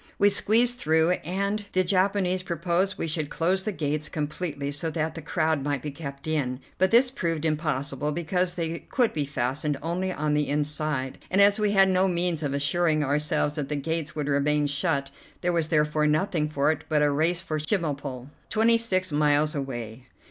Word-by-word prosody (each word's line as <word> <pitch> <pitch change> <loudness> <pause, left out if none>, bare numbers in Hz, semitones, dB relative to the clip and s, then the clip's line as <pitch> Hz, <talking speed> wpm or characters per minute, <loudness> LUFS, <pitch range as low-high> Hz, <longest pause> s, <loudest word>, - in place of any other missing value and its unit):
We 205 - +5
squeezed 235 +4 +3
through, 160 +2 +2
and 200 +5 -2
the 185 - +3
Japanese 185 0 +1
proposed 175 +2 -1
we - - -2
should 155 -2 -2
close 185 +3 +1
the 215 - -2
gates 150 -3 -2
completely, 150 -2 -3
so 145 +3 0
that 160 0 -2
the 165 - -7
crowd 155 -1 0
might 145 -3 -2
be 150 - -4
kept 140 -1 -8
in, 135 -5 -1 0.2
but 190 - +4
this 245 +4 +5
proved 165 - -2
impossible, 150 -2 -1
because 175 +3 0
they 165 -1 -3
could 245 -3 0
be 150 -2 -1
fastened 140 +2 -2
only 180 +3 -1
on 150 -3 -1
the 150 0 +1
inside, 150 -2 -1
and 190 - +1 0.2
we 210 -1 +1
had 195 -1 +6
no 185 +1 +3
means 175 -2 0
of 140 -2 -2
assuring 155 +2 +1
ourselves 150 +1 0
that 145 -3 -4
the 150 - -1
gates 155 +1 -3
would 150 -2 -2
remain 145 +1 +1
shut. 140 -1 0 0.3
There 175 0 0
was 165 -2 +1
therefore 150 -1 +2
nothing 155 0 +1
for 145 0 +2
it 160 - -4
but 150 -2 +2
a 145 - +3
race 165 +5 +1
for 155 -4 -3
Chemulpo, 145 - -3 0.2
twenty 230 +1 +3
six 185 -6 0
miles 150 0 +2
away. 125 -3 -6
155 Hz, 185 wpm, -26 LUFS, 145-180 Hz, 0.3 s, had